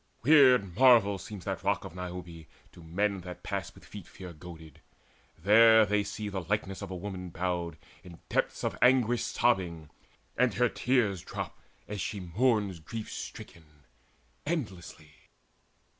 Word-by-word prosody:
Weird 125 - +5
marvel 115 -7 +6
seems 100 -3 -9
that - - -3
Rock - - 0
of - - -9
Niobe 90 -3 -8 0.2
To 85 - -15
men 100 +5 -1
that 90 0 -9
pass - - -4
with - - -16
feet 100 -5 -10
fear 90 -2 -10
goaded: 80 -1 -12 0.6
there 110 +5 +6
They 105 +1 +1
see 105 +1 -5
the 95 -2 -3
likeness 95 +1 -3
of 100 - -6
a 95 - -5
woman 90 -1 -6
bowed, 85 -2 -3 0.3
In 85 -2 -12
depths - - -1
of - - -1
anguish 125 -2 +4
sobbing, 90 -10 0 0.4
and 125 -3 +2
her 125 0 +3
tears 115 -8 +1
Drop, - - -7 0.3
as 105 -2 -5
she 100 - -3
mourns 100 0 0
grief 110 +7 -7
stricken, 75 -3 -10 0.6
endlessly. 95 - -5
95 Hz, 145 wpm, -29 LUFS, 85-110 Hz, 0.6 s, marvel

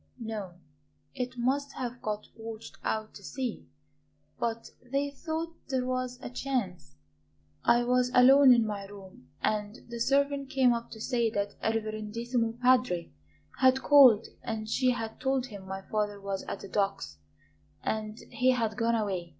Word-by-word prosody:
"No; 215 -6 -5 0.6
it 250 -1 -4
must 275 +4 0
have 245 -1 -5
got 210 -1 -3
washed 225 0 -8
out 215 0 -2
to - - -12
sea; 255 -5 -4 0.7
but 230 -1 -3
they 275 +3 -2
thought 325 +3 -4
there 260 -2 0
was 255 -1 -2
a - - -4
chance. 225 - -3 0.7
I 240 0 +4
was 250 0 +2
alone 265 +2 +8
in 235 -2 +5
my 205 -2 -4
room 195 -9 -13
and 210 0 0
the 235 0 -6
servant 280 +2 +1
came 265 -3 +4
up 235 0 -4
to 220 - -10
say 235 0 +1
that 205 -1 -2
a 220 - +1
'reverendissimo 225 +2 -2
padre' 250 -9 +3 0.5
had 260 0 +4
called 260 -7 +7 0.2
and 220 -1 -4
she 255 +3 +2
had 225 -3 -3
told 265 -1 0
him 200 -6 -10
my 190 0 -5
father 205 0 -2
was 195 -1 -3
at - - -5
the - - -8
docks 195 - -1 0.7
and 215 0 -2
he 255 +1 +2
had 225 -3 -1
gone 230 0 +2
away. 190 -6 -2
235 Hz, 160 wpm, -29 LUFS, 210-255 Hz, 0.7 s, alone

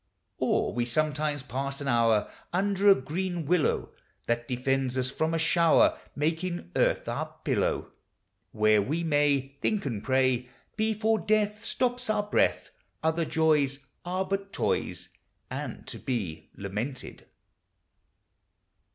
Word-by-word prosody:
Or - - +1
we 120 - 0
sometimes 150 +2 0
pass 135 +2 -3
an 140 - -4
hour 115 -4 +3 0.2
Under 200 +2 +3
a 195 - +9
green 175 +4 -3
willow, 170 +1 +1 0.3
That 120 0 -1
defends 130 +1 0
us 130 0 +1
from 160 +3 0
a 165 - +1
shower, 165 +1 +4 0.2
Making 160 - -2
earth - - +2
our - - -3
pillow; - - 0 0.6
Where 110 -1 +4
we 155 +11 -1
may 145 -3 +1
Think 210 -6 0
and 115 -7 -3
pray, 130 -2 +2 0.3
Before 220 0 +1
death 210 +3 +1
Stops 250 -1 -1
our 215 -1 +2
breath; 205 - +1 0.3
Other 160 +1 +1
joys 150 -4 +2 0.2
Are 185 +2 -1
but 195 +1 -3
toys, - - -1 0.4
And - - -5
to - - -7
be 95 -11 -3
lamented. 105 +7 -5
150 Hz, 125 wpm, -28 LUFS, 130-180 Hz, 0.6 s, a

